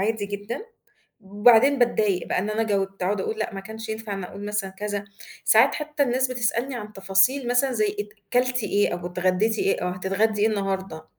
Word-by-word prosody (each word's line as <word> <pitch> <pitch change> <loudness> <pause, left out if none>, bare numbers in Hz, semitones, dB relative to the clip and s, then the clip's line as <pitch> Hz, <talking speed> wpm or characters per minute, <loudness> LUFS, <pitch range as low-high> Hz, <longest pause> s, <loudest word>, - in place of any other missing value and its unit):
عادي 210 0 -1
جدًا، 205 - -5 0.5
بعدين 225 +7 +4
باتضايق 215 -6 +1
بقى - - 0
إن 205 +3 -1
أنا 220 +1 0
جاوبت، 195 -3 -1
أقعد 195 +2 0
أقُول 220 +3 -3
لأ 215 - -3
ما 195 - -5
كانش 220 +2 -9
ينفع 220 -2 -4
إن 195 -2 -5
أقُول 200 +3 -9
مثلًا 210 -2 -2
كذا، 205 +1 -4 0.4
ساعات 230 +5 +5
حتّى 300 -1 -2
الناس 260 0 +1
بتسألني 245 +2 -1
عن 210 -2 -7
تفاصيل 195 +7 +2
مثلًا 250 +2 +2
زي 215 -3 0
أت 205 - -5 0.2
كلتِ 250 -1 +2
إيه؟ 205 -1 +1
أو 175 0 -6
اتغدّيتِ 185 +5 0
إيه؟ - - +1
أو 180 - 0
هتتغدّي 195 +4 0
إيه 220 - +5
النهارده؟ 195 -6 -3
210 Hz, 195 wpm, -24 LUFS, 195-235 Hz, 0.5 s, ساعات